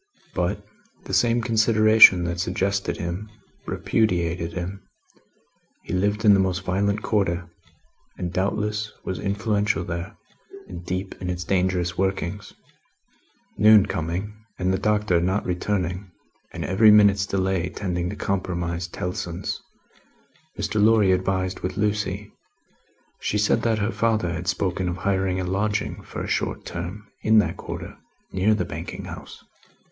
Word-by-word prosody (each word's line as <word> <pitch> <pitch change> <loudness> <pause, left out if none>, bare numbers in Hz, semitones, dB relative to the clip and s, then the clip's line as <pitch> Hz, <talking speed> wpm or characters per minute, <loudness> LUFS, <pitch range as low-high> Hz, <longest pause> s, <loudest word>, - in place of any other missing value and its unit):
But, - - -1 0.4
the - - -7
same 120 0 +3
consideration 110 -4 +6
that 85 0 -3
suggested 100 +2 -1
him, 90 +5 -4 0.4
repudiated 85 -5 0
him; 90 +3 -5 1.0
he - - -6
lived 105 +4 0
in 105 - +8
the 100 - +4
most 95 0 0
violent 100 +3 0
Quarter, 90 -5 0 0.7
and 90 -1 -4
doubtless 105 +2 -1
was 95 - -3
influential 100 0 0
there, 85 +4 -5 0.5
and 85 - -8
deep 95 +2 -3
in 90 - -3
its 90 0 -3
dangerous 90 -2 0
workings. 95 +1 -2 1.1
Noon 105 -1 +7
coming, 90 +4 -3 0.2
and 95 0 0
the 95 - 0
Doctor 105 -5 +2
not 95 +4 0
returning, 90 +1 -2 0.4
and - - -5
every 100 +5 +5
minute's 100 -2 +6
delay 95 -2 0
tending 90 -3 -3
to 100 - -5
compromise 85 -3 -2
Tellson's, 90 0 -4 1.0
Mr. 105 -1 0
Lorry 110 -3 +5
advised 95 0 0
with 90 - -4
Lucie. 105 -1 -1 0.9
She 105 - -1
said 105 +1 +2
that 115 -2 +1
her 105 +1 0
father 110 -8 0
had 85 +2 -5
spoken 95 -1 0
of 90 - -3
hiring 95 -1 0
a - - -1
lodging 100 +3 -1
for - - -6
a - - -5
short - - -2
term, 90 +4 -6
in 110 0 +4
that 105 - +2
Quarter, - - -7 0.4
near 100 +3 +2
the - - -1
Banking - - -6
house. - - -10
95 Hz, 140 wpm, -24 LUFS, 90-105 Hz, 1.1 s, in